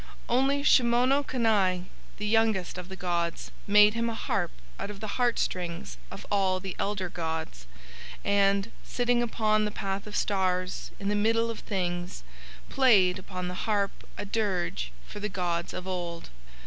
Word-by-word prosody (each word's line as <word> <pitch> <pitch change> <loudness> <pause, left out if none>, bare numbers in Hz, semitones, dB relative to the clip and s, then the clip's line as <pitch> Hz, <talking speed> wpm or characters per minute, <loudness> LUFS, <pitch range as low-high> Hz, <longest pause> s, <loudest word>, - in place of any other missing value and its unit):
Only 270 +3 +2
Shimono 255 +2 +4
Kani, 205 -9 +2 0.3
the 210 - -4
youngest 215 -5 +2
of 180 0 -8
the 190 - -6
gods, 170 -2 -2 0.2
made 210 +1 +7
him 230 0 0
a 230 - -3
harp - - -1 0.3
out - - -4
of 205 -1 -7
the 215 +3 -5
heart 240 -1 +3
strings 170 - -3
of - - -9
all 190 -2 +2
the 190 -1 -6
elder 200 -2 -1
gods, 160 - -4 0.6
and, 200 +1 +3
sitting 245 -1 +1
upon 215 -2 +2
the 210 - 0
Path 200 -1 -4
of 210 - -7
Stars 185 -2 0
in 200 - -4
the - - +2
Middle 230 +2 +2
of 225 - -7
Things, 175 - -3 0.4
played 200 -9 +4
upon 185 -1 -5
the 180 - -4 0.2
harp 200 -2 +2 0.3
a 205 - -4
dirge 185 - -1
for - - -8
the 210 +1 -2
gods 175 -3 -2
of 185 - -6
Old. 175 - -4
200 Hz, 160 wpm, -28 LUFS, 180-225 Hz, 0.6 s, made